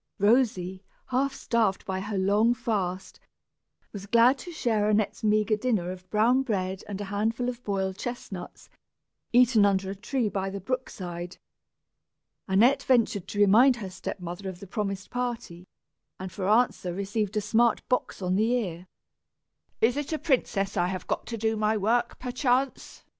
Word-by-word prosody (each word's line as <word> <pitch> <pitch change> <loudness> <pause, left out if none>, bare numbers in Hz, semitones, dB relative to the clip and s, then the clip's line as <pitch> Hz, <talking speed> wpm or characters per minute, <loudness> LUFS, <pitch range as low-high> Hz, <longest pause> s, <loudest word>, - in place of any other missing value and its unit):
Rosy, 200 -4 +2 0.3
half 270 +2 +1
starved 225 -7 0
by 190 -1 -2
her 200 +1 -4
long 205 +5 +3
fast, 190 -5 -3 0.7
was 200 -1 -7
glad 235 +5 +5
to 355 - -8
share 220 -9 0
Annette's 215 0 0
meagre 215 0 +2
dinner 210 -7 0
of 185 0 -10
brown 230 +6 +3
bread 190 -6 -2
and 200 -1 -5
a - - -3
handful 225 +4 0
of 250 0 -5
boiled 190 -1 -2
chestnuts, 210 -7 -7 0.6
eaten 240 -3 +5
under 195 -1 +2
a - - -5
tree 240 +4 -1
by 195 -1 -2
the 200 +1 -5
brookside. 180 -6 -5 1.1
Annette 240 +9 +4
ventured 230 -8 +1
to 205 - -7
remind 225 +6 +6
her 200 -6 -7
step 190 - -6
mother 180 +2 -6
of 180 -2 -9
the 200 - -9
promised 195 0 -4
party, 235 -8 -4 0.5
and, 185 0 -6
for 190 -1 -3
answer, 220 -5 +2
received 205 +2 -2
a - - +2
smart 225 +2 +2
box 250 -5 -1
on 180 0 +1
the 220 +4 +2
ear. 180 -6 -3 0.9
"Is 240 +4 +3
it 290 +1 -3
a 315 - 0
princess 225 -10 0
I 175 - +2
have 185 0 -4
got - - -3
to 230 - -4
do 220 +1 0
my 215 0 +1
work, 235 +4 +1
perchance?" 255 +1 -1
210 Hz, 165 wpm, -27 LUFS, 190-240 Hz, 1.1 s, remind